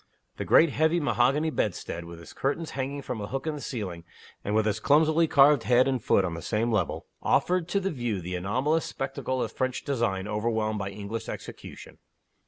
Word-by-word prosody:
The - - -3
great 165 -2 +5
heavy 160 +4 +2
mahogany 145 +1 +2
bedstead, 85 - -2
with 85 0 -10
its 85 - -12
curtains 150 +4 -2
hanging 140 +1 -4
from 115 -4 -4
a 100 - -4
hook 135 +4 -4
in 155 - -1
the 150 - -6
ceiling, 95 -11 -5 0.4
and 105 - -1
with 110 -1 +3
its 110 0 0
clumsily 155 +6 +4
carved 145 -2 +6
head 125 +2 +4
and 130 -4 -1
foot 95 - +3
on 85 - -3
the 85 - -6
same 115 +7 0
level, 105 -6 -1 0.2
offered 180 -2 +2
to 200 - +1
the 195 0 -2
view 120 - -2
the 90 +1 -5
anomalous 130 - 0
spectacle 130 -1 -3
of - - -4
French 130 -1 -2
design 115 -8 -1
overwhelmed 110 0 -1
by 100 -1 -3
English 105 +3 -6
execution. - - -9
120 Hz, 195 wpm, -27 LUFS, 105-145 Hz, 0.4 s, carved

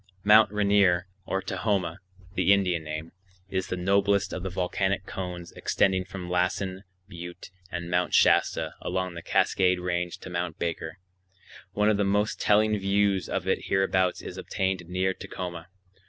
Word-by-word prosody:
Mt. 105 0 +7
Rainier, 100 -4 +3 0.2
or 95 - -1
Tahoma 95 -3 -1 0.3
(the 100 - +3
Indian 90 -4 +1
name), 80 +1 -6 0.4
is 95 -1 -1
the 95 - -3
noblest 100 +2 +2
of 90 - -4
the 95 - -3
volcanic 95 +2 -1
cones 90 -3 -6
extending 95 -1 +1
from 95 -1 -7
Lassen 90 +2 -1 0.2
Butte 85 -1 -9 0.2
and 85 -1 -4
Mt. 90 -2 +1
Shasta - - +3
along 95 -1 -2
the 85 - -7
Cascade 90 +1 +2
Range 90 -1 -2
to - - -11
Mt. 85 -2 -3
Baker. 80 -1 -3 0.8
One 105 +1 +3
of 105 - +1
the 100 - +2
most 105 +2 0
telling 105 +1 +4
views 100 -1 +1
of - - -2
it - - 0
hereabouts 95 -1 +1
is - - -7
obtained 95 -3 -2
near 95 +1 0
Tacoma. 90 -2 -7
95 Hz, 155 wpm, -27 LUFS, 90-100 Hz, 0.8 s, Mt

